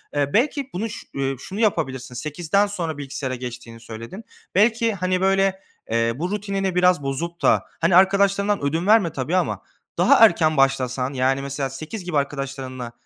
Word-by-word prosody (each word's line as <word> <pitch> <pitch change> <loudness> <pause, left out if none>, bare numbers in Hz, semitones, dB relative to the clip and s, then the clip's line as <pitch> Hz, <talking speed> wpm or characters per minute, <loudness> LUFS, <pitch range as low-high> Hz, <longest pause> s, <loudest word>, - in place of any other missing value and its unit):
Eee, 140 -1 0
belki 275 +3 +1
bunu 215 +5 -3
şu - - -9
ııı, 135 -1 -2
şunu 200 +3 -7
yapabilirsin. 130 - -1
20.00'den 165 +9 0
sonra 170 -6 -4
bilgisayara 135 -2 -4
geçtiğini 120 -2 -8
söyledin. 115 - -9 0.3
Belki, 225 +2 +3
hani 185 -1 -1
böyle, 195 0 +2 0.3
eee, 115 0 +1
bu 175 +7 -3
rutinine 195 -2 -2
biraz 180 -4 +3
bozup 165 +6 -4
da, - - +3 0.2
hani, 170 +1 +3
arkadaşlarından 200 +1 +3
ödün 165 +6 -1
verme 210 -7 +4
tabii 135 +6 -2
ama 185 - 0 0.4
daha 225 - +7
erken 160 -6 +2
başlasan. 135 -1 +1
Yani 135 +1 +1
mesela 140 0 -3
20.00 155 - -7
gibi 165 -5 -1
arkadaşlarınla, 135 -3 -4
160 Hz, 160 wpm, -22 LUFS, 135-195 Hz, 0.4 s, daha